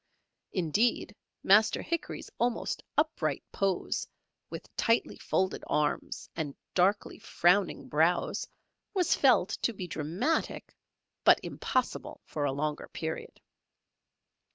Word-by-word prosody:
Indeed, 205 +5 +1 0.3
Master 210 +3 +5
Hickory's 335 +1 -4
almost 240 -1 0 0.2
upright - - 0
pose, 195 -3 -1 0.4
with - - -9
tightly 230 0 +2
folded 190 0 -1
arms, 150 -1 -1
and 150 -4 -3 0.2
darkly 195 +3 +2
frowning 180 +2 +2
brows 160 +4 +1 0.5
was 365 -3 +3
felt - - +4
to 235 - +1
be 190 -3 -5
dramatic, 170 - -2 0.5
but - - +7
impossible - - -2
for 145 -2 -2
a 140 - +1
longer 150 +2 -2
period. 160 0 -5
185 Hz, 105 wpm, -30 LUFS, 155-215 Hz, 0.5 s, but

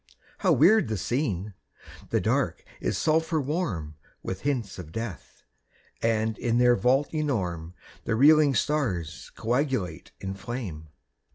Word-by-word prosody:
How - - +3
weird 220 - +5
the 110 -1 -2
scene! 105 - -2 0.6
The - - +2
Dark - - 0 0.2
is - - -1
sulphur 160 +1 +2
warm 130 - -2 0.3
With 95 0 -4
hints 125 -10 -2
of 80 -3 -8
death; 115 -2 -7 0.6
and 110 -1 0
in 120 -1 +1
their 125 0 +5
vault 135 +5 +2
enorme 90 - -2 0.3
The 115 - 0
reeling 145 +2 +6
stars 105 - -1
coagulate 120 - -1
in 95 0 -4
flame. 100 -7 -6
115 Hz, 125 wpm, -27 LUFS, 95-145 Hz, 0.6 s, reeling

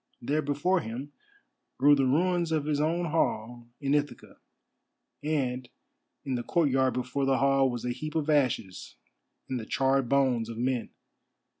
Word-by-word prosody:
There 145 +5 0
before 150 +6 +1
him 135 +2 -6 0.6
grew 145 +3 +6
the 135 -2 +3
ruins 170 +4 +1
of 155 -2 0
his 150 -1 0
own 165 +1 0
hall 120 -6 -1
in 140 -1 0
Ithaca, 145 0 -2 0.8
and 130 -5 -2 0.6
in 135 - -2
the 120 - -1
courtyard 135 -2 +1
before 125 +2 -1
the 135 -1 +2
hall 135 0 +3
was 120 -1 -4
a 125 - 0
heap 155 +5 -6
of 155 -2 0
ashes, 130 -11 0 0.5
and 130 - -2
the 110 - -7
charred 135 -2 +1
bones 130 -5 +2
of 115 - -7
men. 125 0 -1
135 Hz, 155 wpm, -28 LUFS, 125-150 Hz, 0.8 s, grew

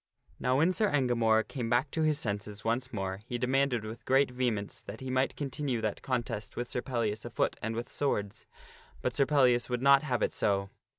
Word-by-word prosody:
Now 125 +1 +2
when 165 +5 +4
Sir 215 +1 +2
Engamore 115 -6 +2
came 120 -4 -4
back 125 +4 +2
unto 160 - -2
his 155 -2 +2
senses 105 -1 -4
once 125 +3 0
more, 95 -2 -3
he 120 - -2
demanded 125 -2 +1
with 110 +2 -8
great 135 0 +3
vehemence 120 -5 -2
that - - -9
he 130 -1 -5
might 130 +1 +1
continue 140 -3 -2
that 110 -2 -2
contest 120 -5 -3
with 120 - -2
Sir 125 - -3
Pellias 115 -5 -2
afoot - - -1
and 110 +1 -2
with 120 +1 -5
swords. 105 -8 -2 0.6
But 125 - -1
Sir 140 -2 +3
Pellias 125 -5 +3
would 125 0 -1
not 140 0 +7
have 130 -5 -1
it - - 0
so. 100 -1 0
125 Hz, 200 wpm, -30 LUFS, 110-135 Hz, 0.6 s, not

